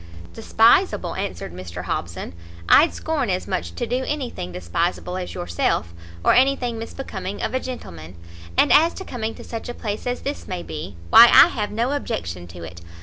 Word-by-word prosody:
"Despiseable!" - - +3
answered - - -5
Mr 90 -1 -7
Hobson, 85 +1 -4 0.3
"I'd 320 +3 +6
scorn 300 -8 -2
as 185 0 -2
much 85 0 -3
to - - -2
do 250 +2 -1
anything 260 - -4
despiseable 90 - -2
as 185 -1 -5
yourself, 85 -1 -1 0.3
or - - +6
any 270 +2 +5
thing 240 -4 -4
misbecoming 205 -5 -6
of - - -3
a 260 - +1
gentleman; 90 - -8 0.4
and - - +5
as 325 +3 +5
to 380 - -7
coming 225 -3 -4
to - - -11
such 230 +1 -7
a 240 - -5
place 210 +2 -5
as 245 0 -2
this 285 +1 -5
may 85 - -4
be, 80 +3 -7 0.2
why 235 - +11
I 240 - +8
have 210 -11 -3
no 235 +5 -1
objection 85 - -4
to 85 0 -10
it. 85 +1 -9
195 Hz, 185 wpm, -22 LUFS, -, 0.4 s, why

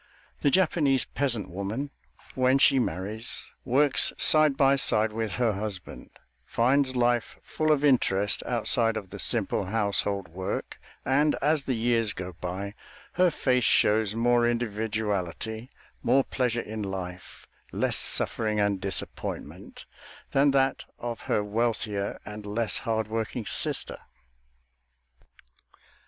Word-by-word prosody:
The 145 - +2
Japanese 150 -5 +2
peasant 120 -10 0
woman, 100 +10 -4 0.4
when 130 +1 +3
she 135 -1 +4
marries, 105 +2 -2 0.2
works 135 +3 +3
side 155 -3 +4
by 135 -1 +4
side 110 -5 +2
with 110 -3 -3
her 120 -1 +1
husband, 100 -2 -6 0.3
finds 130 +2 +1
life 120 -1 0
full 155 0 -1
of 150 -1 +2
interest 105 -7 +2
outside 115 -1 +2
of 95 -4 -8
the 100 - -8
simple 105 -3 +1
household 100 -1 0
work, 95 +4 -5 0.3
and, 145 +4 +2
as 150 +1 +1
the 130 - -1
years 115 -1 0
go 90 -4 -7
by, 95 +4 -6 0.4
her 180 0 +3
face 125 -5 0
shows 105 0 +3
more 120 +1 +2
individuality, 110 -1 -3 0.3
more 135 0 +3
pleasure 125 -3 -1
in 110 0 -6
life, 90 -9 -7 0.3
less - - 0
suffering 110 -1 +1
and 100 -2 0
disappointment, 100 -1 -4 0.5
than 140 +1 +3
that 135 -1 +1
of 120 -2 -5
her 105 - +1
wealthier 105 -2 -2
and 105 0 -8
less 105 -1 -1
hard 110 -1 0
working 110 +1 -4
sister. - - +2
115 Hz, 125 wpm, -27 LUFS, 100-130 Hz, 0.5 s, she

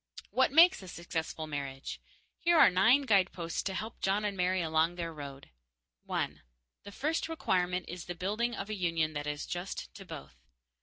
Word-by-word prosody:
What 260 0 +3
makes 335 - +7
a 190 - -10
successful 165 -2 -4
marriage? 140 -3 -5 0.4
Here 340 0 +4
are 255 - +8
nine 220 +10 +5
guideposts 185 - +1
to 190 - -3
help 220 +3 -5
John 200 +2 +1
and 205 -1 -1
Mary 185 0 +1
along 160 0 +2
their 170 -2 -4
road: 140 - -9 0.6
_1. - - -1 0.4
The 200 - -10
first 310 +8 -1
requirement 180 - 0
is 175 0 -6
the 175 - -5
building 215 +7 -1
of 200 +1 -5
a - - -1
union 165 -4 0
that 145 0 -4
is 150 0 -3
just 175 +2 -5
to - - -10
both. 65 -3 -10
180 Hz, 175 wpm, -31 LUFS, 160-210 Hz, 0.6 s, are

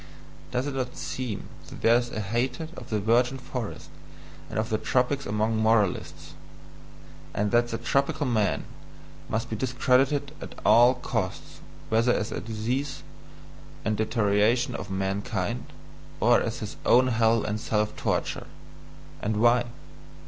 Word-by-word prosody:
Does 125 - -1
it 145 - -3
not 130 -2 -3
seem 125 -6 -4 0.2
that - - -11
there 115 - +6
is 120 0 +1
a 110 - -4
hatred 125 +10 -2
of 125 - -10
the 110 -3 0
virgin 120 +5 +2
forest 125 -3 -6 0.6
and - - -5
of 110 +1 0
the 110 - +1
tropics 130 +2 0
among 110 +2 0
moralists? 110 -3 +1 1.0
And 105 0 0
that 120 0 +4
the 115 - -3
"tropical 140 +5 0
man" 110 -5 +1 0.7
must 110 +1 -1
be - - -1
discredited 130 +4 +2
at - - -8
all 120 +2 +7
costs, 115 -6 -4 0.3
whether 115 +2 +3
as 105 - -2
disease 120 +5 -3 0.8
and 110 - +1
deterioration 110 +2 +2
of 100 - -6
mankind, 95 +3 -2 0.5
or 120 +3 +5
as 115 0 -3
his 105 -1 -6
own 130 +1 +5
hell 115 -1 +3
and 105 0 -2
self 105 0 0
torture? - - -2 0.7
And 105 +1 -1
why? 120 +2 +4
115 Hz, 140 wpm, -27 LUFS, 110-125 Hz, 1.0 s, all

